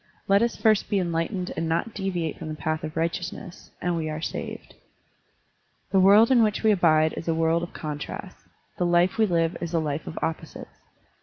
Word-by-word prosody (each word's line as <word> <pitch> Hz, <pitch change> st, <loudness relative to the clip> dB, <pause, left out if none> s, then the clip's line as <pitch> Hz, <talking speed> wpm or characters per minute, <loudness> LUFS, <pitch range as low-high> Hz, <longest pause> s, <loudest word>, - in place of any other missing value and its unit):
Let 200 Hz, +1 st, +4 dB
us 235 Hz, 0 st, +1 dB
first 215 Hz, -2 st, +2 dB
be 205 Hz, -, +1 dB
enlightened 180 Hz, +1 st, -2 dB
and 165 Hz, +1 st, -2 dB
not 170 Hz, +7 st, -1 dB
deviate 180 Hz, -5 st, -3 dB
from -, -, -6 dB
the 155 Hz, -, -4 dB
path 155 Hz, 0 st, -3 dB
of 155 Hz, +1 st, -6 dB
righteousness, 170 Hz, +1 st, -4 dB
and 175 Hz, 0 st, 0 dB
we 160 Hz, -2 st, -2 dB
are 155 Hz, 0 st, -4 dB
saved. 165 Hz, -, -6 dB, 1.2 s
The 195 Hz, -, +4 dB
world 205 Hz, +6 st, +6 dB
in 245 Hz, -3 st, +6 dB
which 215 Hz, -1 st, +1 dB
we 220 Hz, -, +5 dB
abide 160 Hz, -5 st, +3 dB
is 165 Hz, -, -7 dB
a 165 Hz, -, +1 dB
world 165 Hz, +1 st, +2 dB
of 175 Hz, -, -6 dB
contrasts; 150 Hz, -1 st, -7 dB, 0.3 s
the 180 Hz, -, +2 dB
life 175 Hz, +4 st, +2 dB
we 220 Hz, -, +4 dB
live 165 Hz, -2 st, +1 dB
is 170 Hz, 0 st, -3 dB
a -, -, +3 dB
life 150 Hz, -1 st, -3 dB
of -, -, -7 dB
opposites. 160 Hz, 0 st, -5 dB
170 Hz, 200 wpm, -25 LUFS, 160-195 Hz, 1.2 s, world